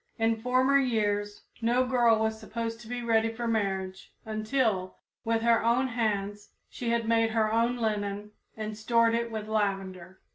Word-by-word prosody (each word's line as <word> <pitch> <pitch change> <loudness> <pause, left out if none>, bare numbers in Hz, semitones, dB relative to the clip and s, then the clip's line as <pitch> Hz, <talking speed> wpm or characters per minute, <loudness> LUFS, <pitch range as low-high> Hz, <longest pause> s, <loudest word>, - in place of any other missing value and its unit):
In 225 -1 +1
former 255 +3 +3
years 205 -5 -1 0.2
no 240 +3 +2
girl 240 -3 +3
was 220 0 -1
supposed 225 +1 -5
to 225 - -12
be 245 +1 -4
ready 225 -1 +2
for 235 +1 -4
marriage 190 -4 -2
until, 215 -3 -1 0.3
with 225 0 0
her 230 -1 +3
own 245 +3 +2
hands, 205 -3 -2 0.2
she 240 - -4
had 230 -1 0
made 225 0 +3
her 220 -1 +1
own 235 +2 +2
linen 210 -2 -2 0.3
and 215 -1 -4
stored 230 +1 +2
it 235 0 0
with 215 -1 -5
lavender. 195 -4 -2
225 Hz, 160 wpm, -28 LUFS, 210-235 Hz, 0.3 s, former